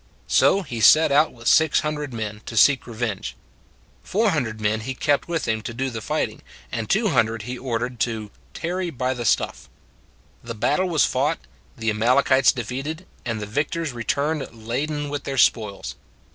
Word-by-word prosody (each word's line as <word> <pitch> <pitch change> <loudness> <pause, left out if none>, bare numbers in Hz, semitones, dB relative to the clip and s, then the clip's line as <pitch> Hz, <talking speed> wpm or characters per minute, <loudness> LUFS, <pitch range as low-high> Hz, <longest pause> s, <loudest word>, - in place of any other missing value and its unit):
So 200 - +4
he 120 -8 -6
set 155 +10 +7
out 150 +3 +4
with 115 -1 -9
six 160 -2 +5
hundred 150 -2 -3
men, 110 -2 -5
to 115 - -5
seek 135 +3 +5
revenge. 110 - -4 0.7
Four 215 +1 +1
hundred 120 -9 -2
men 110 +1 0
he 130 +4 -5
kept 145 +2 +1
with 170 -1 -2
him 110 -1 0
to 115 +1 -6
do 135 +1 -2
the 115 -1 -5
fighting, - - -2 0.3
and - - -3
two - - +2
hun 110 - +3
dred 110 -1 -5
he 125 +3 -5
ordered 125 -1 -3
to 110 -3 -2
" - - -32
tarry 180 +2 -2
by 130 -3 -1
the 120 -2 -5
stuff." - - 0 0.7
The 115 0 -6
battle 150 - +1
was 160 -3 +3
fought, 145 +5 0 0.4
the 110 -2 0
Amalekites 130 +4 +4
defeated, 135 - -5 0.2
and 115 -2 -2
the 105 - -4
victors 145 +6 -2
returned 140 +6 -1
laden 145 +5 -2
with 145 0 -4
their 135 -1 -3
spoils. 105 -5 +1
125 Hz, 180 wpm, -23 LUFS, 115-150 Hz, 0.7 s, set